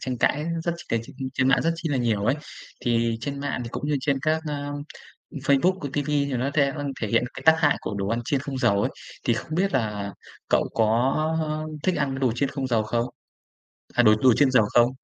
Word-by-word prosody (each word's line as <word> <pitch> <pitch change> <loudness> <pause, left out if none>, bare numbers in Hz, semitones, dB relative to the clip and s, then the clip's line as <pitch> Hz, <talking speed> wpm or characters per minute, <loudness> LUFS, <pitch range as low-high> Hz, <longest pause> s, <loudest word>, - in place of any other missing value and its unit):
tranh 130 -2 -3
cãi 150 +5 +2 0.2
rất 170 - +1
c 170 - -11
tr - - 0 0.4
trên 130 -1 +2
mạng 135 - +4
rất 165 +1 +2
chi 165 -1 -3
là 140 - 0
nhiều 110 -5 0
ấy. 125 - +3 0.5
Thì 115 -2 +1
trên 140 +2 -4
mạng 145 -2 -2
thì - - -5
cũng 145 - -4
như 145 - +2
trên 140 0 +1
các, 155 +1 +2
a, 145 -1 -3 0.6
Facebook, 145 +7 +2
rồi 140 - -3
ti 145 - +1
vi 145 0 0
thì 140 - -3
nó 130 +3 -1
the 140 -2 +2 0.3
thể 110 - 0
hiện 115 +3 +2
cái - - -9
tác 160 0 +8
hại 145 -3 +3
của - - -4
đồ 100 - -2
ăn 115 +3 0
chiên 140 - +1
không 135 0 -5
dầu 100 -5 +2
ấy, - - 0 0.4
thì 120 - +4
không 155 +6 -4
biết 195 +3 +1
là 105 -5 -1 0.4
cậu - - +3
có, 110 - +3 0.6
ơ, 155 0 -2 0.2
thích 185 -2 +2
ăn 140 -2 0
cái 135 0 -4
đồ 130 -4 +2
chiên 140 +1 0
không 135 -2 -3
dầu 115 -3 +2
không? 115 +2 0 0.9
À, 120 - +4
đồ 110 -2 +7
đồ 130 -2 +6
chiên 140 +1 +4
dầu 125 -4 +5
không? 120 0 +6
135 Hz, 245 wpm, -25 LUFS, 120-145 Hz, 0.9 s, tác